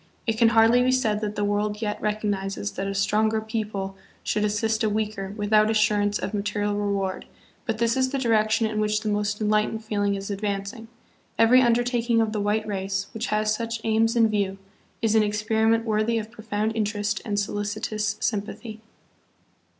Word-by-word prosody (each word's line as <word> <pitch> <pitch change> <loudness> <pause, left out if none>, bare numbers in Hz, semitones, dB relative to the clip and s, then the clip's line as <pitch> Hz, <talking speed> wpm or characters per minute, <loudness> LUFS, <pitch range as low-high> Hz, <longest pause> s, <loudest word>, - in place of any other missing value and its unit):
It 225 -3 0
can 230 +1 +4
hardly 225 +2 +5
be 255 +1 +3
said 220 -5 +1
that 210 -1 -3
the 205 - -1
world 205 +1 0
yet 210 -2 -3
recognizes 205 -1 -2
that 195 - -4
a 195 - -3
stronger 215 +2 +2
people 215 -3 -4 0.3
should 210 - 0
assist 220 +1 0
a 215 - +2
weaker 210 -2 -2
without 215 +1 +3
assurance 210 -1 +2
of - - -4
material 205 0 -1
reward, 200 -2 -2 0.4
but 225 -2 -1
this 235 0 +1
is 260 0 +1
the 275 - -2
direction 225 -2 +2
in 215 -1 -2
which 210 0 +1
the 215 - -2
most 205 0 -1
enlightened 215 +1 0
feeling 205 -2 0
is 195 +1 -5
advancing. 200 +2 -4 0.5
Every 245 +3 +6
undertak 240 0 +1
ing 230 -1 +4
of 220 -1 +1
the 215 -1 -2
white 210 +1 0
race, 195 -1 -3
which 225 +2 -3
has 215 0 +1
such 230 +1 -3
aims 225 +1 +2
in 230 -1 +5
view, 200 -2 -1 0.5
is 220 -1 +2
an 220 - +5
experiment 220 +2 +1
worthy 220 +1 +1
of 220 0 -4
profound 220 -1 -3
interest 210 -1 -1
and 205 -3 -1
solicitous 210 +1 -2
sympathy. 215 +1 -3
215 Hz, 180 wpm, -25 LUFS, 205-225 Hz, 0.5 s, Every